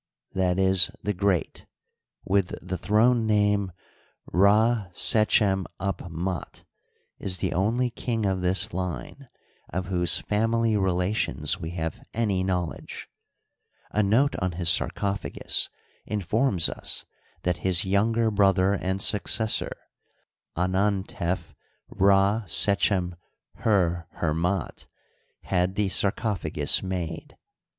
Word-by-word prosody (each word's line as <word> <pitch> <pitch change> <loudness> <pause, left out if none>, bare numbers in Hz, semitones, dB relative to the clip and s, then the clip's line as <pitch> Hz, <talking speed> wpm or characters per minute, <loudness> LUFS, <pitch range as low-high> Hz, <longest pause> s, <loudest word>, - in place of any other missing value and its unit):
e., - - -3
the 95 +1 +2
Great), 95 -2 -1 0.6
with 95 -1 +1
the 95 +1 -5
throne 115 +2 +3
name 105 -2 +2 0.6
Rd 105 +1 +3
sechem'Up'fndt, 95 -4 0 0.6
is 95 -2 -1
the - - -2
only 115 +7 0
king 115 -3 -2
of 95 -1 0
this 90 +1 0
line 95 +9 -5 0.4
of 90 +1 -3
whose 90 -2 +1
family 115 +1 0
relations 90 - 0
we 80 -2 -5
have 80 -2 -4
any 105 -5 0
knowledge. 90 -3 -4 0.8
A 105 - +1
note 115 +8 +2
on 90 -2 -2
his 85 0 0
sarcophagus 100 0 0 0.4
informs 105 -1 +2
us - - -3 0.4
that 90 -1 0
his 90 -1 +1
younger 110 +4 +1
brother 100 -1 +3
and 95 -1 -2
successor, 110 +1 +1 0.8
Anantef 95 -1 -1 0.4
Rdsechem'herher'fndt, 95 -3 0 0.6
had 90 0 0
the 105 -2 0
sarcophagus 100 0 +1
made. 90 -3 -5
95 Hz, 95 wpm, -26 LUFS, 90-105 Hz, 0.8 s, throne